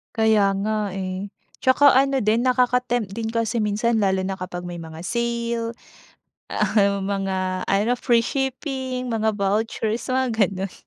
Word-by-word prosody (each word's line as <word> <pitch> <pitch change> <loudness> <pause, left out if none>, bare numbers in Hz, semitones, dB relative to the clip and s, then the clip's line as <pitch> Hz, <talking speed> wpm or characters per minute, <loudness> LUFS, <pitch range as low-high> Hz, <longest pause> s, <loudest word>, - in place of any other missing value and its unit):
Kaya 220 -3 +3
nga 210 -2 -1
eh. 190 0 -4 0.3
Tsaka 260 +1 +5
ano 270 -1 +3
din 220 +4 +2
nakaka-tempt 250 -3 +1
din 225 0 -3
kasi 230 0 0
minsan 220 +2 +1
lalo 190 -2 +2
na 190 0 -3
kapag 180 -1 -6
may 175 -1 -6
mga 160 -1 -9
sale, 235 +2 -2 0.8
ah, 200 -2 +2
mga 190 -1 -2
ano 205 +5 +2
free 235 -1 +2
shipping, 265 -1 -3
mga 220 -2 +1
vouchers, 220 +4 -1
mga 260 0 +2
gano'n. 195 -3 0
220 Hz, 140 wpm, -23 LUFS, 195-240 Hz, 0.8 s, Tsaka